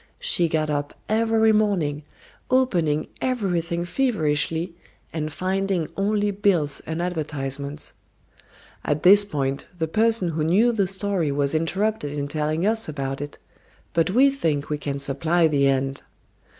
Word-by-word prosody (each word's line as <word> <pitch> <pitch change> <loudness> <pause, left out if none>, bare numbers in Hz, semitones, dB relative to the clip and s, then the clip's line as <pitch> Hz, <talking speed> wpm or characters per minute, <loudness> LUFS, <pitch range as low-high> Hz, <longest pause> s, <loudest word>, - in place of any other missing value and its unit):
She 485 - +2
got 155 -1 0
up 145 0 -3
every 225 0 +3
morning, 190 -9 +1 0.5
opening 175 - +1
everything 175 -9 -1
feverishly 165 - 0 0.4
and 155 -1 -3
finding 190 -1 -1
only 205 +1 +1
bills 190 -8 +1
and 160 +2 -2
advertisements. 145 -4 -4 0.9
At 150 0 -1
this 200 +3 +8
point 140 -8 -3
the 160 -1 -1
person 220 0 +2
who 160 -1 -1
knew 200 +10 +4
the 205 -5 +1
story 190 -5 -1
was 140 0 0
interrupted 165 -1 -1
in 145 0 -2
telling 155 +3 -1
us 220 -3 +1
about 135 -2 -4
it, 145 0 -7 0.6
but 165 +1 +2
we 260 +8 +5
think 155 - -1
we 150 - -1
can 140 -1 -3
supply 155 +5 +1
the 140 -3 +2
end. 135 0 0
165 Hz, 135 wpm, -23 LUFS, 145-205 Hz, 0.9 s, this